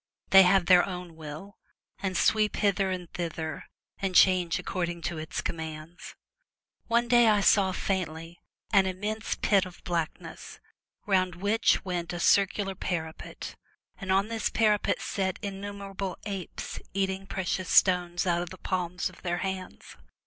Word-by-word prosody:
They 195 - +10
have 190 0 +4
their 180 -1 +7
own 180 -3 -6
will, 160 +6 -9 0.4
and 190 -2 -1
sweep 215 -1 +2
hither 200 -2 +1
and 180 -2 -4
thither, 160 -3 -4 0.3
and 190 -2 -2
change 180 -3 +5
according 175 -2 -3
to 170 -2 -3
its 155 - -4
commands. 160 +1 -6 0.7
One 235 +1 +2
day 240 -1 +5
I 210 -2 +4
saw 195 -1 +4
faintly 170 -3 -3 0.3
an 195 -2 +5
immense 210 +4 -3
pit 200 -3 +3
of 185 -2 -10
blackness, 170 -2 -4 0.5
round 185 -3 +1
which 205 +4 +2
went 175 -2 -3
a 175 - -4
circular 195 +2 +3
parapet, 165 -4 -5 0.4
and 195 -2 -3
on 195 +2 +3
this 225 -1 -1
para 215 -2 +3
pet - - -1
sat 190 -2 -2
innumerable 200 -1 -5
apes 195 -4 -5 0.2
eating 195 0 -1
precious 185 -1 -2
stones 180 -1 +4
out 175 -1 +1
of 175 - -5
the 185 - -10
palms 180 -1 -2
of 185 - -12
their 175 -1 -1
hands. 190 -1 -6
185 Hz, 150 wpm, -28 LUFS, 175-195 Hz, 0.7 s, They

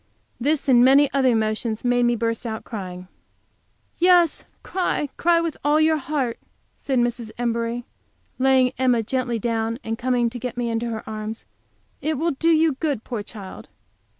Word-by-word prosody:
This, 290 +4 0
and 245 -2 +6
many 275 +2 +5
other 270 -2 +3
emotions, 220 0 -1
made 245 0 +3
me 240 - +2
burst 230 0 -2
out 220 -2 -5
crying. 185 -4 -7 0.9
"Yes, 350 -2 +4 0.2
cry, 355 -5 -1
cry, 340 0 +3
with 335 -3 -2
all 295 +2 +3
your 315 0 +3
heart," 275 -4 -2 0.3
said 270 -3 -2
Mrs. 240 -1 0
Embury, 235 0 -2 0.5
laying 260 -1 +4
Emma 250 -3 +3
gently 245 0 -1
down, 225 0 -1
and 225 0 -4
coming 245 -2 +1
to 245 - -6
get 245 0 -5
me 240 -1 -1
into 230 +1 -2
her 220 -1 -6
arms. 215 0 -6 0.6
"It 310 -1 -1
will 330 +4 0
do 325 +4 0
you 320 -1 +4
good, 285 -8 -1
poor 235 -4 -4
child!" 205 -2 -10
245 Hz, 165 wpm, -23 LUFS, 230-285 Hz, 0.9 s, and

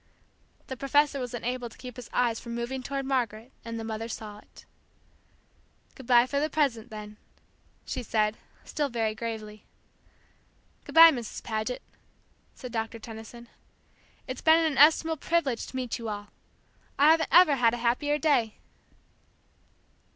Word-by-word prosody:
The 260 - -6
professor 285 +2 +2
was 245 -1 -4
unable 245 +1 -3
to - - -17
keep 250 -2 -9
his 250 -2 -10
eyes 235 -2 +1
from 235 -1 -7
moving 240 +2 -4
toward 275 +1 -4
Margaret, 240 -3 -2
and 230 0 -5
the - - -5
mother 225 0 -4
saw 210 -2 -7
it. - - -18 1.3
"Good 260 - -13
bye 240 -1 +6
for 280 +2 -1
the 305 +2 0
present, 250 -7 0
then," 210 -1 -9 0.7
she - - -4
said, 215 -2 0 0.3
still 295 -2 -2
very 225 -3 -1
gravely. 215 -1 -6 1.2
"Good - - -10
bye, 330 0 +10
Mrs. 240 -6 -6
Paget," 220 +2 -3 0.7
said 250 - -9
Doctor 225 0 -3
Tenison. 225 +1 -10 0.8
"It's 255 -1 -6
been 320 0 +6
an 325 -1 +2
inestimable 315 +3 +4
privilege 290 -6 -1
to - - -11
meet 250 -3 -3
you 230 -1 -5
all. 205 -1 -6 0.7
I 290 +3 +6
haven't 320 0 +2
ever 330 -5 +6
had 235 -1 +3
a - - -5
happier 250 +5 0
day." 275 -8 +1
245 Hz, 150 wpm, -27 LUFS, 225-280 Hz, 1.3 s, bye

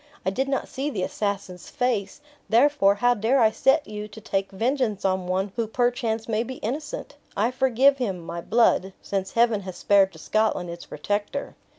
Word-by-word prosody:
I 190 - +1
did 265 +7 -1
not 275 - -1
see 275 +3 -3
the 200 -10 -3
assassin's 195 -3 -3
face, 245 -1 -1 0.3
therefore, 235 -4 +4
how 245 +4 +3
dare 235 +4 +2
I 220 -2 +5
set 270 +6 +3
you 210 0 -6
to 210 +1 -12
take 195 -2 -2
vengeance 225 -1 -1
on 185 -1 0
one 190 +2 -1
who 230 -2 -1
perchance 235 -1 0
may 220 -1 0
be 255 +2 -5
innocent? 290 +6 -5 0.2
I 220 +5 +2
forgive 265 +2 +3
him, 195 -8 -2
my 170 0 -6
blood, 200 -3 +2
since 195 -1 -3
Heaven 230 -3 +3
has 185 -2 -7
spared 195 -1 +4
to - - -13
Scotland 215 -5 0
its 170 0 -9
protector." 205 - -3
220 Hz, 185 wpm, -25 LUFS, 195-250 Hz, 0.3 s, I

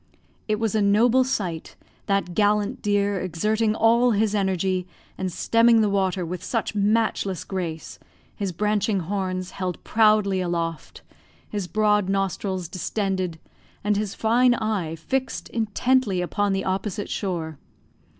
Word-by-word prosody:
It 215 -1 0
was 225 -1 0
a 215 - +2
noble 225 +6 +4
sight, 185 -10 -3 0.3
that 195 -3 0
gallant 205 +1 +1
deer 205 -1 +1
exerting 215 +6 0
all 235 +2 +4
his 210 0 +1
energy, 190 -2 0 0.3
and 190 -1 -3
stemming 230 +5 +4
the 210 -2 +2
water 190 -2 0
with 180 +2 -5
such 230 -2 -2
matchless 205 -2 0
grace, 170 -4 -5 0.4
his 200 -2 -3
branching 205 +1 0
horns 185 0 -3
held 185 -2 -4
proudly 215 -3 +3
aloft, 170 -2 -3 0.4
his 205 -4 -4
broad 210 +1 +2
nostrils 195 -2 -1
distended, 185 -1 -2 0.5
and 210 0 +2
his 205 -1 -2
fine 240 +2 +3
eye 205 -8 -2
fixed 260 +11 -3
intently 230 -1 +1
upon 200 +3 0
the 195 0 -1
opposite 195 +1 -2
shore. 165 -6 -3
200 Hz, 130 wpm, -24 LUFS, 185-215 Hz, 0.5 s, noble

